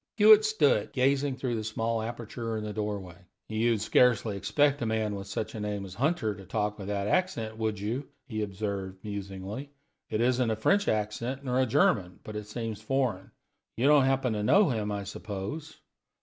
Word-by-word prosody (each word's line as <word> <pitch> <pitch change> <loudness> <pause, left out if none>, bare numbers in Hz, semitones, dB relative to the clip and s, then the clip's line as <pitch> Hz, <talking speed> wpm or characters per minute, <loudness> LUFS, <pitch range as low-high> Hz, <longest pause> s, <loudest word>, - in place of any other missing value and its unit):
Hewitt 215 0 +8
stood 190 - +3
still, - - -29
gazing 135 +1 +2
through 130 -2 -2
the 110 - -3
small 110 +1 -1
aperture 115 0 -4
in 110 - -4
the 105 0 -4
doorway. 100 -4 -4 0.3
"You'd 110 0 +1
scarcely 115 -1 +3
expect 145 +7 +2
a - - 0
man 110 -1 0
with 100 0 -6
such 95 +2 -4
a 110 - -5
name 105 -1 -3
as 95 - -9
Hunter 125 - 0
to 100 -1 -11
talk 105 +2 -2
with 100 - -6
that 100 -1 -1
accent, 115 - 0
would 110 -2 -1
you?" 115 +7 -3 0.2
he 110 -4 -3
observed, 100 -2 -3
musingly. 100 +5 -6 0.4
"It 110 - -1
isn't 125 0 +2
a 110 - +1
French 200 - +2
accent, 115 +5 -1
nor 125 0 +1
a 130 - +3
German; 95 -5 +2
but 105 - -8
it 105 -1 -5
seems 110 -1 -5
foreign. 120 -6 -1 0.5
You 120 - +1
don't 145 -2 +6
happen 130 -3 +1
to 105 - -2
know 190 - +5
him, 110 -4 -1
I 100 -1 -3
suppose?" 105 +10 -6
110 Hz, 190 wpm, -29 LUFS, 105-130 Hz, 0.5 s, Hewitt